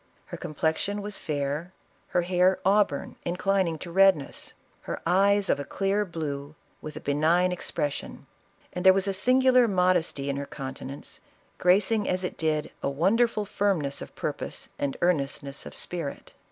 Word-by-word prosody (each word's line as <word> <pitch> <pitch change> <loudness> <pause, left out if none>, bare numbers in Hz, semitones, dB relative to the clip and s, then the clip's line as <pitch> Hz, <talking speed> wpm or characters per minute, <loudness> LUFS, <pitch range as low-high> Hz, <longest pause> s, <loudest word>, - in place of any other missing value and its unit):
Iler - - -5
complexion 160 +7 -1
was 205 -1 -3
fair; 150 +3 -3 0.3
her 175 - +1
hair 180 +1 +3
auburn, 195 -7 +2
inclining 180 -1 0
to 170 +2 -8
red 195 0 +6
ness; 140 - -9 0.3
her - - -5
eyes 195 +3 +3
of - - +2
a - - -2
clear 200 +6 0
blue, 150 -4 -5 0.3
with 155 - -7
a - - -5
benign 160 +6 +2
expres 150 -4 -1
sion; - - -8 0.5
and 180 - -4
there 190 0 +8
was 195 +1 +1
a 195 - 0
singular 255 +4 +4
modesty 180 -7 +1
in 140 0 -1
her 140 0 -4
counte 135 -2 -7
nance, 140 +2 -7 0.4
gracing 205 +4 +3
as 185 0 0
it 180 - -3
did 155 -1 -1
a - - 0
wonderful 210 - +2
firmness 190 -9 0
of - - -9
pur - - -2
pose - - -4
and 140 -1 -2
earnestness 140 -4 -1
of - - -10
spirit." 170 -5 -5
180 Hz, 165 wpm, -27 LUFS, 150-195 Hz, 0.5 s, there